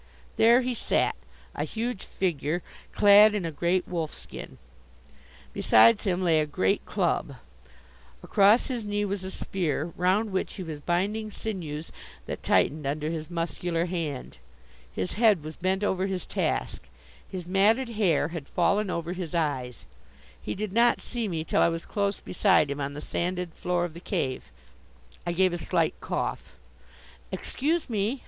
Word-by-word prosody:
There 235 Hz, +3 st, +6 dB
he 255 Hz, 0 st, -1 dB
sat, 230 Hz, -, +1 dB, 0.4 s
a 145 Hz, -, -2 dB
huge 225 Hz, +5 st, -3 dB
figure, 170 Hz, -2 st, -1 dB, 0.3 s
clad 205 Hz, +1 st, +7 dB
in 195 Hz, -4 st, -1 dB
a 165 Hz, -, -2 dB
great 175 Hz, +4 st, 0 dB
wolfskin. 165 Hz, -3 st, -6 dB, 1.0 s
Besides 230 Hz, -1 st, +5 dB
him 185 Hz, -1 st, 0 dB
lay 165 Hz, -3 st, +4 dB
a 150 Hz, -, -1 dB
great 95 Hz, -10 st, +1 dB
club. -, -, 0 dB, 0.9 s
Across 205 Hz, +4 st, +5 dB
his 245 Hz, -4 st, -3 dB
knee 205 Hz, 0 st, -1 dB
was 200 Hz, -1 st, -3 dB
a 190 Hz, -, -4 dB
spear 170 Hz, -4 st, -2 dB
round 195 Hz, +5 st, +1 dB
which 190 Hz, -, -2 dB
he 190 Hz, -, -5 dB
was 160 Hz, -3 st, -6 dB
binding 200 Hz, +7 st, -1 dB
sinews 165 Hz, -8 st, -5 dB, 0.3 s
that -, -, -5 dB
tightened 150 Hz, -1 st, +2 dB
under 150 Hz, +2 st, -2 dB
his 160 Hz, -1 st, -5 dB
muscular 170 Hz, 0 st, -2 dB
hand. 165 Hz, -7 st, -4 dB, 0.5 s
His 95 Hz, -, -3 dB
head 210 Hz, -9 st, +5 dB
was 155 Hz, 0 st, -7 dB
bent 190 Hz, +3 st, -1 dB
over 190 Hz, -1 st, +1 dB
his 190 Hz, -2 st, -3 dB
task. -, -, -2 dB, 0.4 s
His 180 Hz, -2 st, -6 dB
matted 210 Hz, +7 st, +3 dB
hair 185 Hz, -9 st, +1 dB
had 165 Hz, -4 st, -6 dB
fallen 195 Hz, +3 st, +1 dB
over 170 Hz, 0 st, -2 dB
his 175 Hz, -3 st, -5 dB
eyes. 130 Hz, -7 st, -2 dB, 0.6 s
He -, -, -4 dB
did 210 Hz, -1 st, -4 dB
not 235 Hz, +2 st, +4 dB
see 235 Hz, -3 st, -3 dB
me 165 Hz, -4 st, -2 dB
till -, -, +1 dB
I -, -, +5 dB
was 165 Hz, 0 st, -4 dB
close 200 Hz, -1 st, -1 dB
beside 185 Hz, -6 st, +2 dB
him 140 Hz, +1 st, -3 dB
on 140 Hz, +1 st, -3 dB
the 145 Hz, -, -7 dB
sanded 180 Hz, +1 st, -2 dB
floor 175 Hz, -1 st, -1 dB
of 170 Hz, -, -7 dB
the 170 Hz, -, -9 dB
cave. 135 Hz, -, -3 dB, 0.8 s
I -, -, +1 dB
gave 185 Hz, +1 st, +2 dB
a 175 Hz, -, -3 dB
slight -, -, +1 dB
cough. -, -, -4 dB, 0.7 s
"Excuse 315 Hz, +5 st, -1 dB
me!" 225 Hz, +2 st, -1 dB
180 Hz, 160 wpm, -27 LUFS, 160-205 Hz, 1.0 s, clad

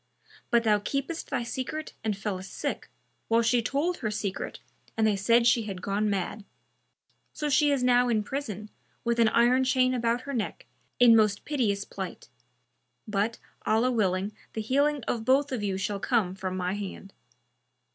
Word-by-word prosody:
But 235 Hz, -1 st, +3 dB
thou 210 Hz, -2 st, +3 dB
keptest 275 Hz, +9 st, -3 dB
thy 255 Hz, -4 st, -1 dB
secret 260 Hz, +6 st, -4 dB
and 215 Hz, -3 st, -1 dB
fellest 195 Hz, -2 st, -4 dB
sick, -, -, -3 dB, 0.4 s
while 230 Hz, +1 st, +3 dB
she 240 Hz, +1 st, +3 dB
told 290 Hz, +9 st, 0 dB
her 220 Hz, -, -2 dB
secret 205 Hz, -2 st, -3 dB, 0.4 s
and 220 Hz, -, +3 dB
they 215 Hz, -2 st, +3 dB
said 230 Hz, +4 st, +3 dB
she 235 Hz, -2 st, +4 dB
had 195 Hz, -3 st, -5 dB
gone 205 Hz, +3 st, 0 dB
mad; 200 Hz, +1 st, -2 dB, 0.9 s
so 300 Hz, -, -2 dB
she 295 Hz, +1 st, +4 dB
is 275 Hz, -3 st, +1 dB
now 245 Hz, 0 st, +4 dB
in 220 Hz, -3 st, +2 dB
prison, 215 Hz, -5 st, -5 dB, 0.3 s
with 235 Hz, 0 st, 0 dB
an 230 Hz, -1 st, +5 dB
iron 245 Hz, +3 st, +4 dB
chain 255 Hz, 0 st, +3 dB
about 235 Hz, 0 st, 0 dB
her 280 Hz, +2 st, -6 dB
neck, 250 Hz, -, -3 dB, 0.3 s
in 240 Hz, -2 st, +8 dB
most 210 Hz, -2 st, +2 dB
piteous 215 Hz, -9 st, 0 dB
plight; 190 Hz, -2 st, -7 dB, 0.8 s
but, 210 Hz, +2 st, 0 dB, 0.3 s
Allah 230 Hz, +4 st, +2 dB
willing, 195 Hz, -3 st, 0 dB, 0.2 s
the 220 Hz, -, -2 dB
healing 280 Hz, +4 st, +1 dB
of 230 Hz, 0 st, -2 dB
both 270 Hz, +4 st, +3 dB
of 250 Hz, -4 st, -2 dB
you 195 Hz, -2 st, -1 dB
shall 195 Hz, +1 st, -2 dB
come 210 Hz, -6 st, +1 dB
from 190 Hz, -1 st, -4 dB
my 180 Hz, 0 st, -1 dB
hand." 195 Hz, -1 st, -7 dB
230 Hz, 170 wpm, -28 LUFS, 205-255 Hz, 0.9 s, in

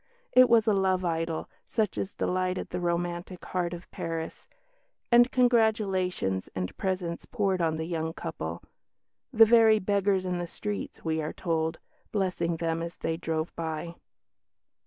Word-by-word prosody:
It 255 Hz, 0 st, +7 dB
was 230 Hz, -2 st, +5 dB
a 215 Hz, -, +3 dB
love 190 Hz, -2 st, +2 dB
idyll 165 Hz, -1 st, -1 dB, 0.2 s
such 215 Hz, -4 st, 0 dB
as 195 Hz, -, -4 dB
delighted 185 Hz, 0 st, -1 dB
the -, -, -2 dB
romantic 175 Hz, +1 st, -2 dB
heart 175 Hz, -2 st, -1 dB
of 175 Hz, 0 st, -9 dB
Paris; 165 Hz, -1 st, -5 dB, 0.6 s
and 240 Hz, +1 st, +6 dB
congratulations 210 Hz, -, +2 dB
and 90 Hz, -1 st, -3 dB
presents 185 Hz, -3 st, -2 dB
poured 195 Hz, -5 st, 0 dB
on 160 Hz, -1 st, +1 dB
the 160 Hz, -, -3 dB
young 160 Hz, -1 st, -2 dB
couple; -, -, -5 dB, 0.7 s
"the 225 Hz, -3 st, +8 dB
very 225 Hz, -1 st, +6 dB
beggars 200 Hz, -1 st, +1 dB
in 180 Hz, -1 st, -1 dB
the 175 Hz, -, -3 dB
streets," 205 Hz, +2 st, -5 dB
we 160 Hz, 0 st, 0 dB
are 155 Hz, -, -4 dB
told, 160 Hz, -1 st, -1 dB, 0.3 s
"blessing 180 Hz, -4 st, 0 dB
them 165 Hz, 0 st, -1 dB
as 170 Hz, 0 st, -5 dB
they 165 Hz, -, -2 dB
drove 160 Hz, -1 st, -3 dB
by." 165 Hz, +1 st, -4 dB
180 Hz, 150 wpm, -28 LUFS, 165-200 Hz, 0.7 s, the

